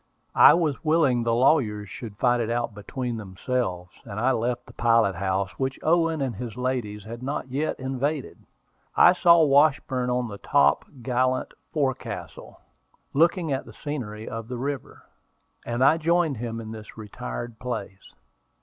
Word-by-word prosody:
I - - +10
was 160 -5 -1
willing 155 -6 +3
the 115 0 +1
lawyers 115 -6 +2
should 105 0 -9
fight 120 0 +2
it 115 - -2
out 120 -1 -1
between 120 +3 -4
themselves, 95 -3 -3
and 105 -2 -6
I 130 +4 +3
left 120 +1 -1
the - - -15
pilot 115 -4 +3
house, 95 +1 -1
which 130 0 -1
Owen 165 -1 +2
and 130 -3 -3
his 120 -2 -7
ladies 125 -5 -2
had 115 +3 -8
not 135 0 -4
yet 145 +5 -2
invaded. 135 +2 -3 0.6
I 175 - +8
saw 170 -2 +6
Washburn 140 -3 +3
on 125 0 0
the 100 -2 -8
top 70 -6 +3 0.2
gallant 130 +1 0 0.2
forecastle, 135 -4 -4 0.5
looking 165 0 +2
at 135 - -3
the - - -12
scenery 110 -8 -6
of 115 0 -6
the 125 0 -5
river, 140 +2 -5 0.6
and 120 +2 0
I 150 +4 +5
joined 165 -3 +1
him 115 0 -4
in 110 -1 -7
this 110 0 -10
retired 110 - -7
place. 105 -6 -6
125 Hz, 160 wpm, -25 LUFS, 110-140 Hz, 0.6 s, I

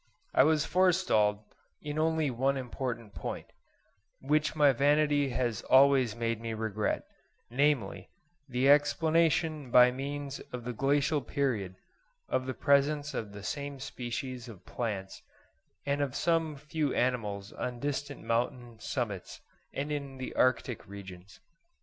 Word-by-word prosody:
I - - +6
was 155 0 +3
forestalled 170 - +3 0.4
in 150 +1 -4
only 160 -2 +1
one 135 +3 +1
important 120 -4 -4
point, - - -6 0.7
which 150 +3 +1
my 145 -2 +6
vanity 145 +1 +3
has 120 -4 -1
always 130 -4 +5
made 115 -1 -2
me 115 -1 -4
regret, 110 -1 -1 0.5
namely, 125 -8 +1 0.4
the 125 +1 +1
explanation 155 0 +3
by 125 +1 +7
means 140 +1 -5
of 125 -1 -5
the 125 +1 -4
Glacial 145 +4 +1
period 115 -8 -1 0.5
of 130 0 -1
the 130 - -3
presence 145 +1 +2
of 110 -3 -4
the 100 -1 -9
same 140 +1 -4
species 125 -1 -5
of 105 -6 -12
plants 100 -5 -4 0.6
and 140 0 0
of 140 -3 -2
some 165 -2 +1
few 150 0 -2
animals 105 -5 -1
on 125 -1 -4
distant 145 +1 -3
mountain 120 0 -2
summits 110 -6 -4 0.3
and 145 +2 -3
in 140 -2 -4
the 130 - -5
arctic 125 -2 +1
regions. 100 0 -11
130 Hz, 130 wpm, -30 LUFS, 115-145 Hz, 0.7 s, by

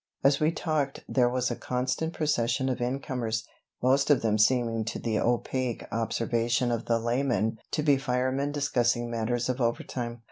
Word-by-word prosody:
As 140 0 +4
we 155 +1 +3
talked 155 -5 -2
there 125 -2 +3
was 125 0 0
a - - -1
constant 125 +7 -2
procession 135 -4 0
of 125 - -2
in 125 +3 -1
comers, 115 -5 -2 0.4
most 135 +3 +3
of 145 -5 +4
them 110 -1 +2
seeming 115 0 +3
to 105 - -3
the 110 -2 -1
opaque 120 +1 -1
observation 115 +2 0
of 115 -1 -2
the 115 - +2
layman 115 -2 0
to 150 - -1
be 145 -3 +4
firemen 130 +1 0
discussing 120 -4 +1
matters 120 +1 -1
of 130 0 -2
overtime. 120 0 -2
125 Hz, 170 wpm, -28 LUFS, 115-135 Hz, 0.4 s, As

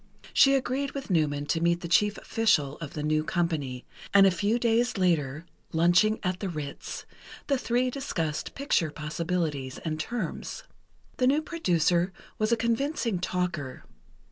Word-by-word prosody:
She 275 0 +6
agreed 270 +1 -1
with 275 -6 -5
Newman 145 -4 +1
to 165 +2 0
meet 170 +1 +2
the 170 - -4
chief 210 +5 +3
official 155 -11 +1
of 155 -4 -7
the 150 - -4
new 155 0 +1
company, 155 -7 -2 0.3
and 195 0 +9
a 195 - +6
few 205 +6 +1
days 235 0 +1
later, 160 -5 +1 0.3
lunching 175 +6 +4
at 185 -1 -1
the 195 - -3
Ritz, 150 -4 -6 0.4
the 275 -2 +1
three 250 +1 +1
discussed 165 - -3
picture 270 - +1
possibilities 150 -3 -3
and 155 -1 -2
terms. 235 +8 -4 0.5
The 255 - +3
new 290 +4 +3
producer 180 - +1 0.3
was 215 +1 +1
a 235 - +4
convincing 235 - 0
talker. 175 -7 -3
180 Hz, 150 wpm, -28 LUFS, 155-235 Hz, 0.5 s, and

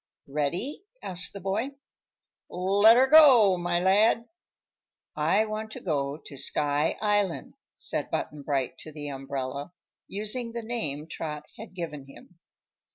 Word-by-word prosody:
"Ready?" 150 - -2 0.2
asked 180 -1 -3
the 200 - -8
boy. 210 +9 -2 0.7
"Let'er 205 +7 +5
go, 265 -9 +7
my 175 0 0
lad." 210 +5 +3 0.9
"I 165 +8 +2
want 215 0 -5
to - - -7
go 145 -4 -2
to 145 -3 -12
Sky 145 +2 0
Island," 205 -4 0 0.2
said - - -1
Button 150 -1 -3
Bright 135 -3 -2
to 155 - -10
the 145 -1 -7
umbrella, 135 +2 -5 0.3
using 230 +4 -2
the 235 -1 -4
name 155 -11 -3
Trot 150 -2 -5 0.2
had 220 -4 -10
given 150 -6 -6
him. 165 +5 -16
180 Hz, 130 wpm, -27 LUFS, 145-215 Hz, 0.9 s, go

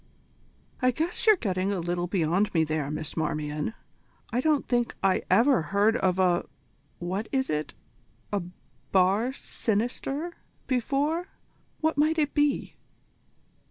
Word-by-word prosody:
"I 255 - +4
guess 325 - -1
you're 430 - +8
getting 190 - -1
a 195 - -1
little 175 +1 -1
beyond 180 +2 +1
me 160 - +4
there, 155 -2 -1
Miss 155 0 -4
Marmion. 150 +4 -2 0.6
I 245 - +2
don't 300 0 +2
think 240 -1 0
I 190 -1 +3
ever 230 +2 +5
heard 200 +7 +2
of 185 -4 +1
a 180 -2 +2 0.5
what 185 +5 -3
is 265 - 0
it? 150 0 -2 0.6
a 200 - +1 0.5
bar 195 +6 +3
sinister, 265 +7 -2 0.3
before. 285 - 0 0.5
What 315 -2 +1
might 310 +2 +3
it 295 -2 +1
be?" 290 -2 +1
205 Hz, 130 wpm, -27 LUFS, 175-275 Hz, 0.6 s, you're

